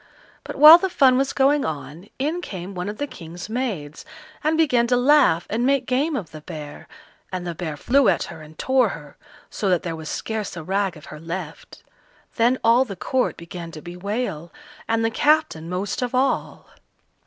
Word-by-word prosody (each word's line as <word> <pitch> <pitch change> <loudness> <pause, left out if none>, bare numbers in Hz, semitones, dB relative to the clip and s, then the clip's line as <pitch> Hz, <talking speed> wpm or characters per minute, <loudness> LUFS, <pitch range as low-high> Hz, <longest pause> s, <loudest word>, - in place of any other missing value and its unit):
But - - -7
while 305 +4 +10
the 380 - -1
fun 265 -7 +4
was 270 +1 +1
going 280 +1 +2
on, 150 +5 -6
in 310 +6 -2
came 190 - -7
one 180 +1 -4
of 210 - -6
the 290 - -2
King's 175 - -9
maids, 210 - -4 0.4
and 310 +1 +1
began 250 -7 +3
to 245 0 +2
laugh 255 - +4
and 230 +3 -1
make 270 0 +2
game 280 +5 0
of 190 - -5
the 155 - -10
bear, 150 -2 -9 0.4
and 185 -1 -4
the 175 - -3
bear 160 -3 -5
flew 265 - +3
at 175 - +1
her 160 - -9
and 155 0 -14
tore 260 -4 +2
her, 150 -5 -9 0.4
so 200 - -2
that 180 -2 +2
there 170 -2 -3
was 160 -1 -8
scarce 215 -5 -4
a 165 - -6
rag 190 0 -1
of 150 - -14
her 155 - -9
left. 165 0 -8 0.5
Then 240 +2 +3
all 235 +3 +5
the 210 -7 -7
court 255 +8 -1
began 170 0 -8
to 155 - -9
bewail, 180 -2 -4 0.4
and 225 0 +1
the 225 - 0
captain 295 - +1
most 190 +5 -3
of 250 0 -2
all. 265 +1 -1
205 Hz, 195 wpm, -22 LUFS, 170-260 Hz, 0.5 s, while